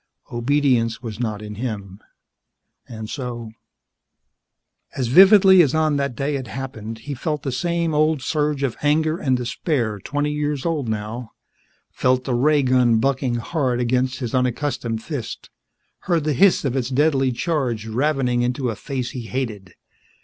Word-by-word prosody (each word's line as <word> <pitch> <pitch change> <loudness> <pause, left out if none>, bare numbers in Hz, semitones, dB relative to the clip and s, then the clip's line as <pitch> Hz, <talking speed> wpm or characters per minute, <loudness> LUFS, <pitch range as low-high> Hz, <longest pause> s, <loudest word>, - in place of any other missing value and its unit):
Obedience 120 -2 +1
was 110 -2 -6
not 110 -3 -3
in 105 0 -7
him, 105 -4 -5 0.9
and 110 -2 -7
so 120 -3 -5 1.4
As 125 -3 -1
vividly 190 - +8
as 150 -3 +2
on 155 -2 +2
that 140 -3 -2
day 140 +2 -1
it 130 -3 -6
happened 115 -3 -6
he 145 +6 -6
felt 150 +2 -3
the 135 - -2
same 170 +5 -1
old 155 -2 +2
surge 150 -2 0
of 130 -4 -1
anger 155 +2 +1
and 130 -2 +1
despair 120 - -2
twenty 145 +7 -2
years 150 -2 -2
old 155 -8 -1
now, 110 +2 -5 0.6
felt 125 0 +1
the 130 - -2
ray 145 +4 +3
gun 125 -3 +3
bucking 130 0 0
hard 125 0 -1
against 125 +1 0
his 120 -4 -5
unaccustomed 125 -3 -1
fist, 140 -8 -6 0.5
heard 170 -4 0
the 150 0 0
hiss 180 +3 +4
of 130 -2 -1
its 130 -2 -1
deadly 135 -1 +2
charge 125 -6 -1
ravening 125 +1 0
into 125 0 -1
a - - -5
face 125 +2 -4
he 120 -3 -7
hated. 110 -8 -4
130 Hz, 155 wpm, -22 LUFS, 120-150 Hz, 1.4 s, vividly